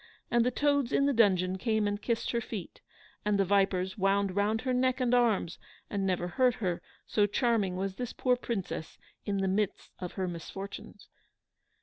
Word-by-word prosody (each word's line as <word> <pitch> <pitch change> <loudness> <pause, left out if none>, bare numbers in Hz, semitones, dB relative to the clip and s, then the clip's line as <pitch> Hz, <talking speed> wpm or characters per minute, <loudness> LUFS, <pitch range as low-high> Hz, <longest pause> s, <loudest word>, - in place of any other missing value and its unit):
And 235 -1 +4
the 250 - +2
toads 285 -1 +1
in 275 - +3
the 280 - +3
dungeon 190 -5 +3
came 220 -1 +1
and 205 0 -2
kissed 230 -2 -1
her 235 - 0
feet, 210 -6 -7 0.4
and 210 -1 +2
the 195 - +3
vipers 190 0 +1
wound 195 0 +2
round 210 +2 +1
her 255 -1 -1
neck 255 +1 +2
and 250 -1 +1
arms, 225 -8 +2 0.3
and 195 -2 0
never 180 -1 0
hurt 250 +7 +2
her, 180 -5 -2 0.2
so 205 -1 +2
charming 210 -4 +1
was 190 +1 -3
this 245 -2 -3
poor 250 -1 +2
Princess 200 -9 -4 0.3
in 200 -2 -1
the 195 - +1
midst 200 +1 -1
of 180 -2 -5
her 190 -2 -2
misfortunes. 180 +3 -8
205 Hz, 185 wpm, -30 LUFS, 190-235 Hz, 0.4 s, And